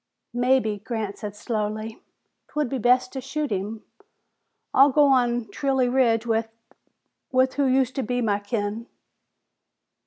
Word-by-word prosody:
"Mebbe," 245 -4 +1
Grant 220 -4 -4
said 210 -2 -6
slowly, 215 0 -4 0.5
"'twould 300 -4 -2
be 265 - -2
best 250 +2 +3
to 265 - -4
shoot 290 +1 -3
him. 210 +3 -3 0.9
I'll 275 +2 +7
go 295 +2 +5
on 240 -3 +2
Trilley 265 0 +1
Ridge 235 -3 +3
with 225 -1 0 0.8
with 260 0 +3
who 285 - +1
used 260 -1 +2
to - - +1
be 245 +1 -2
my 210 -4 +1
kin." 205 +2 -3
240 Hz, 135 wpm, -24 LUFS, 220-260 Hz, 0.9 s, I'll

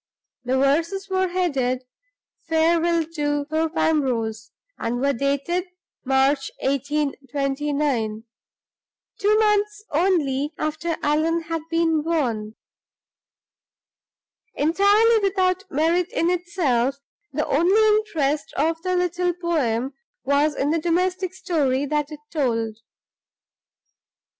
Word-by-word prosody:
The 255 +1 0
verses 330 +9 +1
were 375 0 +2
headed 275 -9 0 0.7
"Farewell 330 +1 +2
to 290 -2 -1
Thorpe 315 +2 -1
Ambrose," 230 -8 0 0.3
and 240 +1 -2
were 280 +2 +2
dated 280 +8 -1 0.4
"March, 270 +1 +2
1829" 275 -3 -1 1.0
two 425 +1 +3
months 420 -1 +1
only 295 -4 +1
after 325 +2 -2
Allan 315 +3 +1
had 330 0 -3
been 330 -2 +2
born. 240 -10 -1 2.0
Entirely 405 +8 +4
without 380 -1 0
merit 330 +4 +1
in 350 -8 +1
itself, 310 -8 0 0.4
the 300 +2 -1
only 420 +8 +4
interest 305 -9 -1
of 325 +3 0
the 365 +1 -1
little 355 0 0
poem 280 -8 -1 0.3
was 285 +2 +2
in 285 +2 0
the 330 - +1
domestic 365 +2 0
story 285 -7 0
that 295 +1 -1
it 300 -1 -9
told. 230 -8 -1
310 Hz, 100 wpm, -23 LUFS, 275-355 Hz, 2.0 s, Entirely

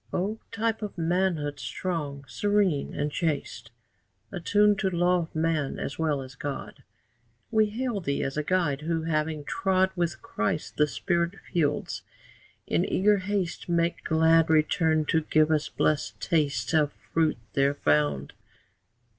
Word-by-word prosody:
O 210 +5 -1
type 225 0 -1
of 210 -3 -5
manhood, 165 -4 0
strong, 140 +2 -4
serene, 205 -4 +1
and 145 +1 -2
chaste, 145 -7 -2 0.6
Attuned 205 +3 +3
to 195 - +1
law 180 0 +2
of 165 -2 -6
man 160 -3 0
as 140 - -5
well 150 -4 0
as 130 0 -11
God, 140 0 -6 0.7
We 215 -1 +4
hail 230 0 -2
thee 140 -4 -1
as 135 - -3
a 150 - 0
guide, 155 -3 0
who, 165 +1 -1
having 155 -1 -1
trod 190 +4 +1
With 175 -2 -2
Christ 105 +8 -2
the 150 - +4
spirit 170 +3 -1
fields, 150 -5 -1 0.6
in - - +1
eager 205 +2 +3
haste 185 -3 -2
Makes 170 0 +1
glad 160 0 +4
return 160 0 +3
to 160 +1 +2
give 155 0 +2
us 155 -1 +1
blessed 155 -1 0
taste 150 -2 0
Of 150 -2 +3
fruit 160 -4 0 0.2
there 140 +1 +2
found. 75 - +1
160 Hz, 145 wpm, -27 LUFS, 145-185 Hz, 0.7 s, We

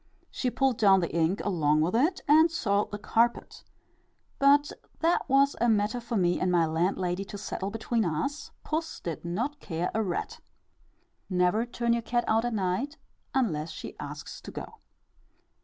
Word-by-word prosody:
She 255 - -1
pulled 265 -1 +1
down 195 -3 +6
the 170 - -3
ink 170 +4 +1
along 155 -6 +2
with 175 +6 +1
it, 315 +10 +2
and 315 +3 +6
soiled 210 -11 0
the 205 - -5
carpet, 230 +3 0 0.8
but 285 +1 +5 0.3
that 335 -3 +1
was 275 +1 +4
a 240 - +4
matter 215 +2 +1
for 235 -1 -3
me 175 -2 +2
and 185 - +1
my 170 -2 +4
landlady 180 +3 0
to 205 - -8
settle 200 -1 -4
between 225 +2 -1
us; 175 - -2
puss 320 +1 -3
did 165 -3 -5
not 235 +13 -3
care 170 -5 -3
a 220 - +1
rat. 185 -5 -3 0.9
Never 185 +5 +2
turn 235 0 0
your 235 - 0
cat 240 +1 0
out 225 +2 +2
at 240 - -1
night 200 +10 -1 0.4
unless 170 - 0
she 155 - -8
asks - - -7
to - - -9
go. - - -8
215 Hz, 170 wpm, -28 LUFS, 180-250 Hz, 0.9 s, down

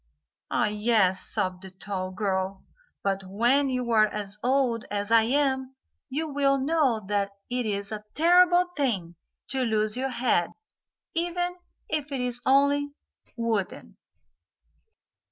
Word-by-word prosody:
"Ah, - - +1
yes," 210 -3 +2
sobbed 185 -1 -2
the 190 - -9
tall 185 0 -5
girl. 190 0 -2 0.5
"But 195 -1 -1
when 240 +9 +2
you 250 -2 -2
are 215 -1 +5
as 210 0 -5
old 250 -3 +1
as 205 +1 -3
I 230 -1 +7
am 265 +1 0 0.3
you 305 +4 -2
will 280 -1 +2
know 270 -6 +1
that 200 -1 0 0.2
it 245 -2 -1
is 200 0 -3
a 210 -1 -5
terrible 355 +2 +5
thing 205 - -1 0.4
to 265 -1 +1
lose 215 -2 +1
your 265 +2 -1
head, 240 -9 +1 0.6
even 350 +1 -1 0.3
if 300 -2 -2
it 270 - -2
is 245 -1 0
only 280 +1 +3 0.4
wooden." 225 -5 -2
235 Hz, 135 wpm, -26 LUFS, 205-275 Hz, 0.6 s, I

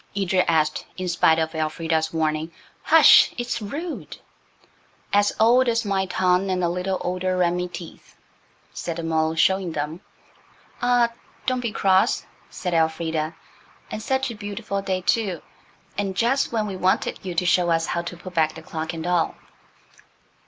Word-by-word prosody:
Edred 190 -2 +2
asked, 155 -2 +1
in 185 -1 -3
spite 165 -2 +3
of 160 0 -1
Elfrida's 160 0 -1
warning 155 0 -1 0.3
"Hush! 320 0 +7
it's 240 -1 -3
rude." 305 - -6 1.0
"'S 205 0 +4
old 245 +4 +5
as 230 0 0
my 195 -1 0
tongue 185 +1 +1
an' 185 -1 0
a 170 - +1
little 180 +2 -2
older'n 180 -1 0
me 180 0 -2
teeth," 175 -1 -11 0.6
said 170 - -4
the 170 - -5
mole, 160 0 0
showing 185 +1 +2
them. 155 +4 -4 0.8
"Ah, 245 -1 +3 0.4
don't 255 -1 +1
be 235 -3 -2
cross," 190 -2 +2 0.2
said 180 -2 -4
Elfrida, 160 -1 0 0.6
"and 215 - -4
such 265 +2 -1
a - - -7
beautiful 205 -1 -4
day, 190 -1 -2
too, 185 -2 0 0.6
and 195 -2 -2
just 260 +4 +2
when 220 -2 0
we 200 -2 -4
wanted 185 0 0
you 180 -2 -5
to 180 - +1
show 175 -1 +3
us 165 0 +2
how 170 - -1
to 175 0 -7
put 185 +1 -10
back 160 -2 +1
the 160 - -10
clock 160 +1 -5
and 165 0 -5
all." 175 -2 +1
180 Hz, 160 wpm, -23 LUFS, 165-205 Hz, 1.0 s, Hush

